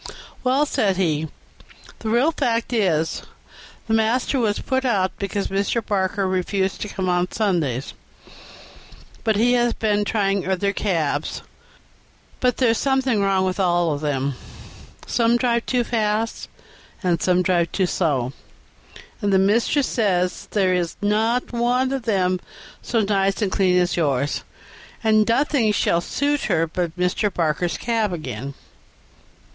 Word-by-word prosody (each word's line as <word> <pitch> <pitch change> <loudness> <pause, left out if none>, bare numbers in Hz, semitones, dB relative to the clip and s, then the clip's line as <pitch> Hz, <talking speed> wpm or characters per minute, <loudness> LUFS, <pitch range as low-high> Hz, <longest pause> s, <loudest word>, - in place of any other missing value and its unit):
"'Well,' 260 +3 +3
said 195 -9 0
he, 160 -4 0 0.7
'the 220 - -4
real 245 +8 +3
fact 240 -6 -1
is, 170 -8 +1 0.7
master 225 +4 +1
was 210 -3 +1
put 260 0 -1
out 200 -7 +1
because 200 0 -2
Mr. 200 +3 -1
Barker 195 -1 0
refused 190 +1 -1
to - - -2
come 190 -2 -3
on 180 0 +1
Sundays, 160 - -1 1.3
and 220 -2 +3
he 240 +3 +3
has 240 -1 +2
been 210 -2 0
trying 200 -3 0
other 200 +1 0
cabs, 160 -8 -1 1.0
but 250 -2 +1
there's 230 -3 +2
something 265 -5 +1
wrong 195 -1 +2
with 185 -1 -1
them 190 - +2
all; 150 -5 0 0.7
some 235 0 +2
drive 235 -1 0
too 250 -1 +1
fast, 220 -1 -1 0.5
and 175 -2 +1
some 180 0 +2
too 180 +1 +1
slow, 140 -8 0 0.9
and 205 - +1
the 190 - +5
mistress 230 +8 +2
says 185 -7 0
there 190 -3 +2
is 175 -2 -1
not 220 +5 0
one 245 +2 +1
of 270 -3 -3
them 185 -4 +1 0.4
so 230 -2 0
nice 195 -1 +1
and 195 - 0
clean 185 -2 +2
as 180 -1 +2
yours, 145 -4 0 0.6
and 215 0 +3
nothing 245 -2 +2
will 170 - +2
suit 285 +9 -1
her 170 -5 +2
but 170 +1 -3
Mr. 180 +3 0
Barker's 170 0 -1
cab 225 -4 0
again.'" 135 -5 -5
200 Hz, 135 wpm, -22 LUFS, 180-230 Hz, 1.3 s, the